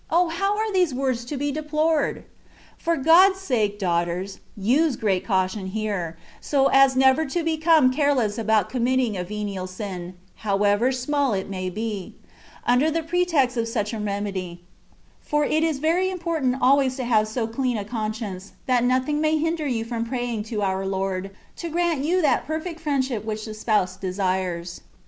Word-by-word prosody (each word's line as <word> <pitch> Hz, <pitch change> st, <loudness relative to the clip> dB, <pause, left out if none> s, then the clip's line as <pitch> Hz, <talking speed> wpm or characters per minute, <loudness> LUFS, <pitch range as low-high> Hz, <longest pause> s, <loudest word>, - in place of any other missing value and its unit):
how 360 Hz, +4 st, +1 dB
are 435 Hz, -1 st, -1 dB
these 360 Hz, -8 st, +2 dB
words 255 Hz, -2 st, -1 dB
to 275 Hz, +4 st, -5 dB
be 285 Hz, +1 st, -1 dB
deplored! 305 Hz, +1 st, 0 dB, 0.5 s
For 335 Hz, 0 st, 0 dB
Ood's 355 Hz, +7 st, +5 dB
sake, 220 Hz, -, 0 dB
daugh 175 Hz, -4 st, +1 dB
ters, 185 Hz, +3 st, -5 dB, 0.2 s
use 260 Hz, +8 st, +2 dB
great 195 Hz, -5 st, 0 dB
caution 190 Hz, -1 st, 0 dB
here, 190 Hz, -5 st, -3 dB, 0.2 s
so 275 Hz, -2 st, +2 dB
as 270 Hz, -1 st, +6 dB
never 265 Hz, +3 st, +4 dB
to 335 Hz, +5 st, -2 dB
become 315 Hz, -4 st, +3 dB
careless 255 Hz, -7 st, +1 dB
about 220 Hz, -3 st, +2 dB
committing 250 Hz, -2 st, 0 dB
a 180 Hz, -, -2 dB
venial 200 Hz, -1 st, -4 dB
sin 185 Hz, -2 st, -6 dB, 0.2 s
(however 205 Hz, +3 st, +2 dB
small 270 Hz, 0 st, 0 dB
it 195 Hz, 0 st, -3 dB
may 185 Hz, -1 st, -3 dB
be), 210 Hz, -1 st, -5 dB, 0.5 s
under 250 Hz, +6 st, +3 dB
the 325 Hz, +1 st, -1 dB
pretext 325 Hz, -7 st, +1 dB
of 230 Hz, -1 st, 0 dB
such 220 Hz, -2 st, -2 dB
a 220 Hz, -, -3 dB
remedy; 200 Hz, -4 st, -4 dB, 0.6 s
for 295 Hz, 0 st, 0 dB
it 315 Hz, +2 st, +1 dB
is 320 Hz, -3 st, +1 dB
very 335 Hz, +6 st, +1 dB
important 330 Hz, -8 st, -1 dB
always 265 Hz, 0 st, +3 dB
to 260 Hz, -, -4 dB
have 220 Hz, -3 st, +2 dB
so 225 Hz, +1 st, -2 dB
clean 245 Hz, +1 st, -1 dB
a 205 Hz, -, -4 dB
conscience, 215 Hz, -3 st, -5 dB
that 250 Hz, -2 st, +2 dB
nothing 260 Hz, +4 st, +1 dB
may 315 Hz, 0 st, +2 dB
hinder 320 Hz, -1 st, -1 dB
you 230 Hz, -4 st, -1 dB
from 230 Hz, -1 st, -3 dB
praying 240 Hz, -2 st, -3 dB
to 215 Hz, -2 st, -3 dB
our 190 Hz, 0 st, 0 dB
Lord, 190 Hz, 0 st, -2 dB, 0.3 s
to 340 Hz, -, -5 dB
grant 335 Hz, -3 st, 0 dB
you 350 Hz, +4 st, +1 dB
that 290 Hz, -, +2 dB
perfect 320 Hz, +2 st, -4 dB
friendship 265 Hz, -8 st, -1 dB
which 215 Hz, -1 st, -4 dB
the 215 Hz, -, -6 dB
Spouse 210 Hz, -4 st, 0 dB
desires. 185 Hz, -2 st, -2 dB
245 Hz, 170 wpm, -24 LUFS, 205-300 Hz, 0.6 s, as